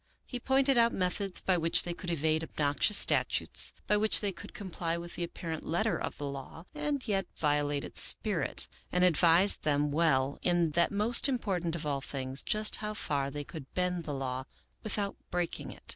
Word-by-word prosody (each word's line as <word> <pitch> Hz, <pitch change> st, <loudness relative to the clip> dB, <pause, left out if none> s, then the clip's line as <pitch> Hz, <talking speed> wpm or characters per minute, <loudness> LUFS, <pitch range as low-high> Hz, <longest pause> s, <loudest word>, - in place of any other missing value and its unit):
He 250 Hz, -, -6 dB
pointed 270 Hz, 0 st, +2 dB
out 235 Hz, 0 st, +3 dB
methods 185 Hz, +1 st, 0 dB
by 185 Hz, -2 st, +1 dB
which 165 Hz, 0 st, +4 dB
they 175 Hz, -, -4 dB
could 175 Hz, +1 st, -8 dB
evade 160 Hz, -1 st, 0 dB
obnoxious 150 Hz, +6 st, +1 dB
statutes, -, -, +3 dB
by 210 Hz, -, +2 dB
which 215 Hz, +1 st, +5 dB
they 205 Hz, -2 st, -1 dB
could -, -, -10 dB
comply 170 Hz, -4 st, -4 dB
with 170 Hz, 0 st, -8 dB
the 175 Hz, -, -4 dB
apparent 165 Hz, -2 st, -6 dB
let 170 Hz, +5 st, -1 dB
ter 225 Hz, -, 0 dB
of -, -, -5 dB
the 145 Hz, -, -5 dB
law 140 Hz, +4 st, -8 dB
and 295 Hz, -3 st, -3 dB
yet 195 Hz, -2 st, -1 dB
violate 145 Hz, -1 st, 0 dB
its -, -, -1 dB
spirit, 190 Hz, -10 st, +2 dB, 0.2 s
and 180 Hz, 0 st, +1 dB
advised 175 Hz, +2 st, +5 dB
them 145 Hz, -1 st, 0 dB
well 140 Hz, -3 st, +1 dB
in 175 Hz, -3 st, +1 dB
that 170 Hz, +3 st, +2 dB
most 220 Hz, +6 st, +3 dB
important 185 Hz, -10 st, -2 dB
of 160 Hz, -2 st, -5 dB
all 140 Hz, -2 st, -2 dB
things, 135 Hz, -1 st, -3 dB
just 215 Hz, 0 st, +3 dB
how 210 Hz, 0 st, -5 dB
far 140 Hz, -8 st, -1 dB
they 145 Hz, +1 st, -6 dB
could 145 Hz, -2 st, -10 dB
bend 180 Hz, -2 st, -1 dB
the 150 Hz, -, -4 dB
law 130 Hz, -1 st, -4 dB, 0.4 s
without 205 Hz, -2 st, -2 dB
breaking 175 Hz, -1 st, -3 dB
it. -, -, -15 dB
170 Hz, 190 wpm, -30 LUFS, 150-200 Hz, 0.4 s, which